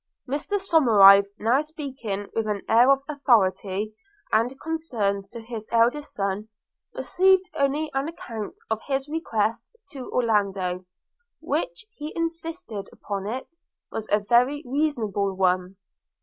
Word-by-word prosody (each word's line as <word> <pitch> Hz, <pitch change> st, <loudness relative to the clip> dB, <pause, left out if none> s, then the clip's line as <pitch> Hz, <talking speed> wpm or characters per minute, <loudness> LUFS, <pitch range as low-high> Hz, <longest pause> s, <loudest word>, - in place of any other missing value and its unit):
Mr 285 Hz, +9 st, -3 dB
Somerive, 210 Hz, -, +7 dB
now 240 Hz, +6 st, +2 dB
speaking 270 Hz, -, -5 dB
with 225 Hz, -1 st, -1 dB
an 205 Hz, -2 st, -2 dB
air 235 Hz, +3 st, +5 dB
of 275 Hz, 0 st, +4 dB
authority 215 Hz, -, +1 dB, 0.4 s
and 245 Hz, +5 st, +1 dB
concern 225 Hz, -12 st, -2 dB
to 235 Hz, -, -7 dB
his 225 Hz, -1 st, -7 dB
eldest 240 Hz, +6 st, +2 dB
son, 200 Hz, +2 st, -2 dB, 0.5 s
received 380 Hz, 0 st, +3 dB
only 295 Hz, +1 st, 0 dB
an 270 Hz, +2 st, -1 dB
account 230 Hz, -10 st, -6 dB, 0.2 s
of 220 Hz, 0 st, 0 dB
his 270 Hz, 0 st, -1 dB
request 230 Hz, -9 st, -1 dB, 0.3 s
to 265 Hz, -4 st, -8 dB
Orlando, 195 Hz, -6 st, 0 dB, 0.5 s
which, -, -, -3 dB
he 300 Hz, +1 st, -6 dB
insisted 330 Hz, -, -4 dB
upon 200 Hz, -1 st, -5 dB
it, 260 Hz, +9 st, -6 dB, 0.3 s
was 220 Hz, -1 st, -5 dB
a 210 Hz, -, +4 dB
very 250 Hz, +7 st, +2 dB
reasonable 235 Hz, -9 st, -1 dB
one. 185 Hz, 0 st, +1 dB
235 Hz, 125 wpm, -25 LUFS, 205-295 Hz, 0.5 s, Somerive